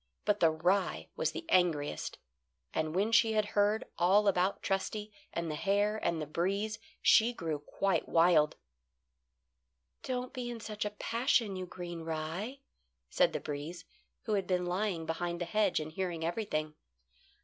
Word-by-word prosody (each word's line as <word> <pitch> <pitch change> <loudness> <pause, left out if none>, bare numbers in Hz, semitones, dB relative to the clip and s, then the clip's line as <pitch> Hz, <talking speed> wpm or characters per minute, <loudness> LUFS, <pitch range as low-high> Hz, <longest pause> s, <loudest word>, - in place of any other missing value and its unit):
But 210 0 +2
the 165 - +6
rye 180 +5 0
was - - 0
the 330 - -6
angriest, 160 - +1 0.6
and 155 +1 -1
when 205 +4 +2
she 230 -1 +5
had 215 -1 +2
heard 205 +1 +2
all 195 +4 +5
about 190 0 +2
Trusty 210 +2 -2 0.2
and 170 -2 -2
the - - -2
hare 205 +5 +1
and 170 -1 0
the 155 - -2
breeze 195 +8 -1 0.2
she 230 +2 +6
grew 160 -8 -3
quite 170 +3 -1
wild. 165 -3 +4 1.5
"Don't 250 -1 -3
be 250 -2 -4
in 235 -1 -5
such 215 -1 -4
a - - 0
passion, 230 -3 +1
you 185 -1 -5
green 175 -2 -6
rye," 165 - -4 0.5
said - - +4
the - - -2
breeze, 155 +4 -6 0.4
who 220 - -1
had 195 -3 0
been 180 -1 +1
lying 180 -2 -1
behind 170 +1 -2
the 175 - -2
hedge 205 +1 +2
and 155 0 -5
hearing 170 -2 -3
everything. 165 -5 -2
185 Hz, 160 wpm, -32 LUFS, 165-210 Hz, 1.5 s, the